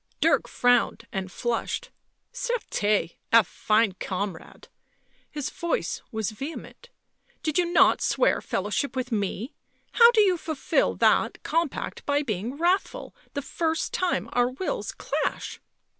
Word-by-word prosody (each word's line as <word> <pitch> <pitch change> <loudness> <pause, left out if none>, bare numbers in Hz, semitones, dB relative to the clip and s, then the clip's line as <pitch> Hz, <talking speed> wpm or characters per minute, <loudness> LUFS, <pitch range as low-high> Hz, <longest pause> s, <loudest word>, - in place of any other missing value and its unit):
Dirk - - +3
frowned 245 -1 +2
and 190 -1 -4
flushed. 240 - -2 0.2
" - - -51
Certes! 465 - 0
— - - -48
a 230 -1 +7
fine 215 0 +1
comrade!" 190 -3 -5 0.6
his 295 -3 -4
voice 340 - -2
was 220 -2 -2
vehement. 305 - -8 0.5
"Did 310 +1 +1
you 345 -1 +1
not - - +5
swear - - +2
fellowship 210 +7 -2
with 255 -1 -2
m 205 -2 +1
el 200 +4 -3 0.4
How 470 -1 +8
do 460 -3 +4
you 375 -3 +3
fulfil 315 -3 0
that - - +2
compact 330 -3 -2
by 290 +1 +2
being 230 +2 -3
wrathful 370 +9 0 0.2
the 285 - -2
first 320 +2 -1
time 345 - 0
our 245 0 +3
wills 270 +9 -3
clash?" - - -3
270 Hz, 140 wpm, -26 LUFS, 215-345 Hz, 0.6 s, How